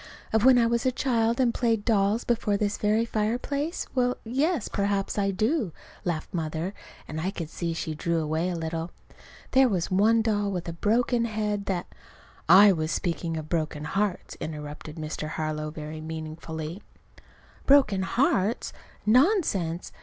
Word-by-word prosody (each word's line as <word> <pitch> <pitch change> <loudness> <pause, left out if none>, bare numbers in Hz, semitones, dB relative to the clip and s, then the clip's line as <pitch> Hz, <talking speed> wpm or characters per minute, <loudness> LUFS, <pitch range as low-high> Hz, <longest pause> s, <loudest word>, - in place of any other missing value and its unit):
"Of 220 -1 +3
when 260 0 +7
I 235 - +4
was 235 0 +1
a 260 - +2
child 235 -2 +1
and 245 -3 +3
played 225 -4 0
dolls 210 0 +2
before 220 -4 +1
this 205 0 0
very 215 +2 +2
fireplace? 250 - -1
Well, 250 -1 +1
yes, 275 - 0
perhaps 200 -1 -1
I 200 -1 +2
do," 215 - 0 0.3
laughed 165 -3 -3
Mother. 165 +2 -2 0.3
And 155 0 -4
I 180 - 0
could 165 -5 -6
see 170 -1 -2
she 160 -1 -3
drew 170 +2 -1
away 160 +3 -1
a 180 - -2
little. 165 0 -3 0.6
"There 260 -1 +5
was 185 -5 -1
one 220 +4 +4
doll 205 -2 +1
with 180 -3 -4
a 170 - -3
broken 235 +6 +1
head 210 -2 -2
that 180 -3 -1 0.4
" - - -27 0.2
"I 205 - +7
was 155 -3 -1
speaking 170 -1 -2
of 155 -1 -5
broken 155 -2 -2
hearts," 195 +4 -2
interrupted 150 0 -6
Mr. 155 -1 -4
Harlow, 155 -1 -3
very 155 0 -7
meaningfully. 160 +2 -6 0.9
"Broken 270 -9 +5
hearts! 215 0 +1 0.3
Nonsense! 215 - +2
200 Hz, 160 wpm, -27 LUFS, 160-230 Hz, 0.9 s, when